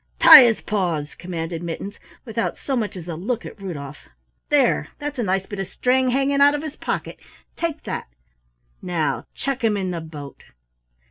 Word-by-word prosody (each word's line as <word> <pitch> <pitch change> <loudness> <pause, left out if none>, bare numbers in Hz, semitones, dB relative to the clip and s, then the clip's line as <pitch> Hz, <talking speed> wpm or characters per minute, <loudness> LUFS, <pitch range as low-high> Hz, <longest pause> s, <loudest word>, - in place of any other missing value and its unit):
"Tie 315 -3 +11
his 230 -2 +1
paws!" 170 -8 -2
commanded 165 -2 -5
Mittens, 175 +4 -6 0.3
without 230 -1 -2
so 270 - -3
much 215 -5 -2
as 175 -1 -9
a 170 - -4
look 215 +9 -3
at 205 - -10
Rudolf. 145 -7 -7 0.4
"There 75 0 +3
that's 290 -2 -5
a - - +1
nice 190 -1 0
bit 205 0 -7
of 195 - -3
string 255 +1 +1
hanging 275 +2 +1
out 285 +1 +6
of 295 - -4
his 310 -2 -6
pocket - - -4 0.4
take 335 -3 -3
that. - - -4 0.7
Now 170 -4 -1
chuck 270 -3 -3
him 215 -2 +2
in 190 -2 -2
the 170 -2 -4
boat!" 150 -3 -10
200 Hz, 180 wpm, -22 LUFS, 170-260 Hz, 0.7 s, Tie